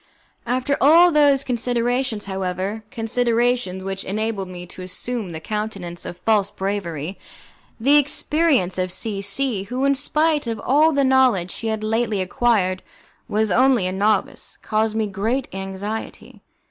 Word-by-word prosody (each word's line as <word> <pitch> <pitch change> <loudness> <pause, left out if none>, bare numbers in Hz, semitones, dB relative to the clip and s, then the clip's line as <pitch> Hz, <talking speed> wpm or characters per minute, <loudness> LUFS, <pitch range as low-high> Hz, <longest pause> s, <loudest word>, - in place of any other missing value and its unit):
After 255 +3 0
all 335 +5 +7
those 285 -3 +4
considerations, 245 -2 -1
however, 190 +2 -3
considerations 235 -4 0
which 195 0 -4
enabled 210 -1 -2
me 180 -1 -8
to 180 - -11
assume 200 +2 -4
the 160 - -5
countenance 200 -2 -5
of 175 - -7
false 210 -3 +3
bravery, 190 -4 -4 0.6
the 260 +5 +2
inexperience 290 - +2
of 185 0 -1
C 200 +1 -3
C, 205 0 -1
who, 250 +5 -2
in 280 - +4
spite 300 +1 +1
of 225 -2 -3
all 300 +5 +4
the 280 -2 +2
knowledge 255 -9 +3
she 225 - -4
had 220 -1 -2
lately 220 -1 0
acquired, 185 -1 +1 0.5
was 215 0 0
only 250 -1 +4
a 185 - -1
novice, 205 +3 -1
caused 220 0 0
me 220 -1 +1
great 220 +6 -2
anxiety. 195 +3 -6
220 Hz, 145 wpm, -21 LUFS, 195-255 Hz, 0.6 s, all